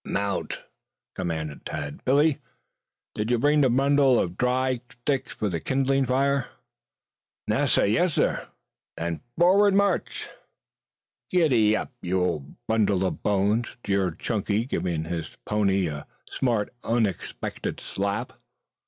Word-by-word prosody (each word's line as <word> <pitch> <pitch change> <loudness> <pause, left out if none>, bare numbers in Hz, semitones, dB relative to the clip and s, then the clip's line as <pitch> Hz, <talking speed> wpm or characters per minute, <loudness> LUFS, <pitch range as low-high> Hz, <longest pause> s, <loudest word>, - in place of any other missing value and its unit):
"Mount!" 100 -1 -2 0.5
commanded 80 -5 -4
Tad. 75 -2 -5
"Billy, 145 +3 +3 0.7
did 105 +2 -2
you 120 - +3
bring 145 +4 +3
that 135 - +4
bundle 135 0 +4
of 90 -1 -1
dry 125 +1 +1
sticks 130 +2 -2
for 105 -3 -2
kindling 135 - +1
the - - -8
fire?" 135 +1 +1 1.0
"Nassir, - - +3
yassir." 130 - +1 0.5
"Then, 85 0 -3 0.2
forward 195 +4 +5
march!" 200 0 +1 1.0
"Giddap, 125 -12 +3
you 95 +1 0
old 80 -6 -2
bundle 100 -4 +2
of 95 - -3
bones," 105 +3 +1
jeered 95 -4 0
Chunky, 105 0 -1
giving 85 - -2
his 80 -1 -5
pony 100 -3 +1
a 75 -3 -5 0.2
smart 115 -5 -1
unexpected 115 -4 -2
slap. 100 +1 -3
110 Hz, 115 wpm, -26 LUFS, 95-135 Hz, 1.0 s, forward